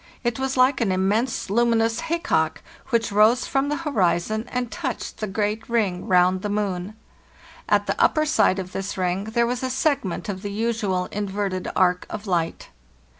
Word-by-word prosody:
It 240 0 -1
was 265 0 -1
like 255 +1 +4
an 210 -5 +2
immense 200 +4 0
luminous 230 0 +2
haycock, 335 +2 0 0.3
which 235 -3 +1
rose 215 +4 +4
from 275 +1 0
the 295 - 0
horizon 215 - 0
and 245 -2 -2
touched 280 -9 -4
the 215 - -3
great 210 +3 -2
ring 205 -6 0
round 185 0 +3
the 210 - -3
moon. 200 -1 -2 0.7
At - - +3
the - - -1
upper 310 -1 +3
side 220 -10 +3
of 185 -1 -5
this 195 +1 -4
ring 185 +1 -1
there 235 +2 +1
was 245 +1 -2
a 260 - -1
segment 260 - -1
of 190 -2 -4
the 205 -1 -5
usual 210 -4 -1
in 205 0 -2
verted 190 -2 -2
arc 180 -1 +2
of 215 0 -6
light." 170 -4 -2
215 Hz, 175 wpm, -23 LUFS, 190-240 Hz, 0.7 s, like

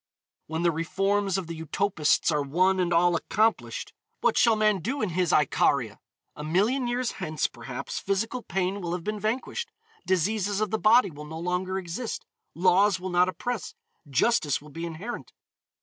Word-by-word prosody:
When 160 +2 -2
the 170 - +4
reforms 195 +4 0
of 190 - -3
the 165 -1 -7
utopists 165 -1 +1
are 150 -1 +1
one 185 +7 +2
and 175 -1 +1
all 175 +1 +4
accomplished, 220 +6 0 0.3
what - - +2
shall 230 -2 +5
man 215 -2 +2
do 255 - -3
in 210 - 0
his 180 0 0
Icaria? 135 -6 +2 0.4
A 150 - -7
million 210 - +1
years 245 0 -1
hence, 155 -5 -2
perhaps, - - -5
physical 225 +6 -1
pain 190 0 -2
will 170 -1 -3
have 175 -1 -3
been 215 +2 -3
vanquished. 255 - -2 0.4
Diseases 200 +2 +1
of 215 -2 -1
the 220 - 0
body 225 -1 +5
will 150 0 -9
no 160 +1 -7
longer 180 +2 -1
exist. 190 +6 -4 0.3
Laws 185 +3 +4
will 185 0 -5
not 180 +1 +4
oppress. 240 +3 -4 0.3
Justice 145 - +2
will 150 +1 -14
be 165 +3 -5
inherent. 180 +9 -7
185 Hz, 170 wpm, -27 LUFS, 165-215 Hz, 0.4 s, shall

